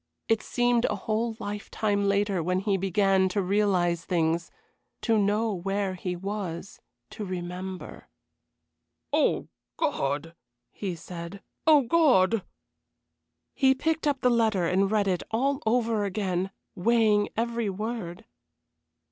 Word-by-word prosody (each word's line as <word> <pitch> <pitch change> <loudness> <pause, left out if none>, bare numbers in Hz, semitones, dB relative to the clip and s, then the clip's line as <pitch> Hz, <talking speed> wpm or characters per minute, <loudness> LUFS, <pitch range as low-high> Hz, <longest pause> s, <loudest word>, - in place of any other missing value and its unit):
It 225 -1 +2
seemed 245 0 +1
a 210 - 0
whole 220 +3 -2
lifetime 205 0 -1
later 200 -2 +1
when 180 +3 0
he 200 -1 +1
began 195 0 +2
to 200 +2 0
realize 180 -3 +1
things 170 -1 0 0.5
to 230 - +2
know 210 +1 +2
where 195 +1 -1
he 180 0 -4
was 190 -1 -5 0.3
to 215 - -6
remember. 185 0 -6 1.1
"Oh, - - +2 0.3
God!" 145 +4 -1 0.4
he 190 -4 -4
said. 170 +3 -8 0.2
"Oh, 300 -3 +7
God!" 230 - +4 1.1
He 265 -1 +4
picked 320 +3 0
up 280 -2 0
the 250 - +4
letter 220 -6 +2
and 190 +3 +2
read 210 -1 +1
it 180 -3 +1
all 270 +5 0
over 225 -2 +2
again, 190 -2 -1 0.2
weighing 215 +1 +3
every 235 -1 0
word. 210 -1 -5
200 Hz, 120 wpm, -27 LUFS, 185-225 Hz, 1.1 s, Oh